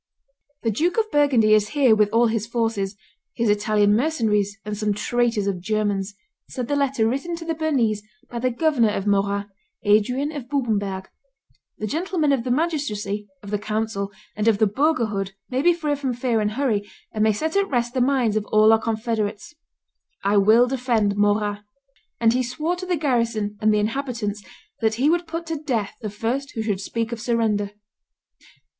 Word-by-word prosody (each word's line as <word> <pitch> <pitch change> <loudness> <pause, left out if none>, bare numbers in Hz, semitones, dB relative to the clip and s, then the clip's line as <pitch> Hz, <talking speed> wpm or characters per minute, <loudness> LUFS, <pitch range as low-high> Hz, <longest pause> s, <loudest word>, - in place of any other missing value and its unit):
"The 225 - +1
Duke 340 - 0
of 440 -1 +1
Burgundy 260 -8 +4
is 210 -1 +3
here 255 -6 +6
with 210 -1 +3
all 230 +3 +3
his 220 -2 -1
forces, 225 -4 -1 0.4
his 230 -3 +2
Italian 210 0 +3
mercenaries 215 -7 +1
and 210 0 -3
some 210 -1 -1
traitors 235 -1 0
of 195 -3 -2
Germans," 205 -1 -1 0.3
said 250 -3 -4
the 285 - 0
letter 275 -5 +1
written 275 +8 -2
to 335 0 -8
the 330 - -1
Bernese 265 -10 0 0.3
by 240 - -5
the 255 +2 +1
governor 250 -3 +2
of 195 -1 -2
Morat, 200 0 +1 0.3
Adrian 240 +8 +2
of 280 -5 -7
Bubenberg; 205 -8 -1 0.7
"the 215 - -4
gentlemen 320 - 0
of 265 -4 +1
the 255 - -4
magistracy, 235 -9 -1 0.2
of 200 - -8
the 210 - 0
council, 215 -2 -2 0.2
and 210 +1 -1
of 220 -3 +4
the 220 - +4
burgherhood 215 -5 0 0.2
may 255 +1 +1
be 350 +4 +5
free 315 -4 -1
from 270 -3 -2
fear 245 -2 0
and 210 0 -1
hurry, 240 -5 +1 0.3
and 215 -1 0
may 220 - +4
set 315 - -2
at 400 0 +2
rest 240 -2 0
the 255 - +1
minds 250 -4 +2
of 215 -1 0
all 215 +1 +5
our 225 - +3
confederates: 220 +1 -2 0.7
I 200 +1 +3
will 215 +5 +6
defend 240 -5 0
Morat;" 205 0 +1 0.6
and 230 0 +4
he 255 - +1
swore 300 +8 -2
to 370 +1 -6
the 360 -2 +1
garrison 230 -7 0
and 215 0 +4
the 210 - +3
inhabitants 215 -2 -2 0.4
that 220 -1 +1
he 275 +7 +3
would 345 0 0
put 330 +1 -4
to 325 -1 -3
death 235 -9 -2
the 215 - -3
first 235 +7 -3
who 225 - -2
should 205 -3 -1
speak 230 +3 -3
of 235 -2 -5
surrender. 215 -4 0
225 Hz, 185 wpm, -23 LUFS, 210-270 Hz, 0.7 s, here